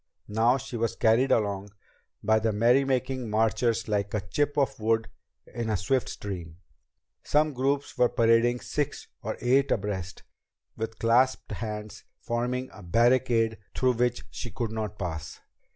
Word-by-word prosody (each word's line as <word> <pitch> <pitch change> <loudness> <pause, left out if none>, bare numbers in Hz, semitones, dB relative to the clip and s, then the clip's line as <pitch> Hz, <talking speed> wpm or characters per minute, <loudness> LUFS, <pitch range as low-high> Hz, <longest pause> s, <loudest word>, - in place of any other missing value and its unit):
Now 115 +4 +3
she 125 -2 -6
was 115 0 -1
carried 115 +4 +3
along 100 -2 +1 0.5
by 110 +1 +4
the 110 0 +1
merrymaking 130 +2 +2
marchers 115 +1 +1
like 100 -1 -1
a 105 - 0
chip 145 +8 0
of 140 -5 +1
wood 115 +1 +1 0.4
in 115 -2 -4
a 105 - +1
swift 120 +8 0
stream. 85 -5 -6 0.6
Some 150 0 +2
groups 135 +1 -1
were 125 -1 +5
parading 115 +1 +3
six 145 -1 -3 0.2
or - - -4
eight 135 +3 +3
abreast, 95 -3 -2 0.5
with 110 0 -5
clasped 125 +3 +2
hands 105 -1 -5 0.2
forming 125 +2 -2
a 100 - -12
barricade 115 +3 +2 0.2
through 130 -1 +3
which 120 0 0
she 120 - -6
could 115 +2 -3
not 110 -1 -4
pass. 80 -5 -5
115 Hz, 145 wpm, -27 LUFS, 105-125 Hz, 0.6 s, were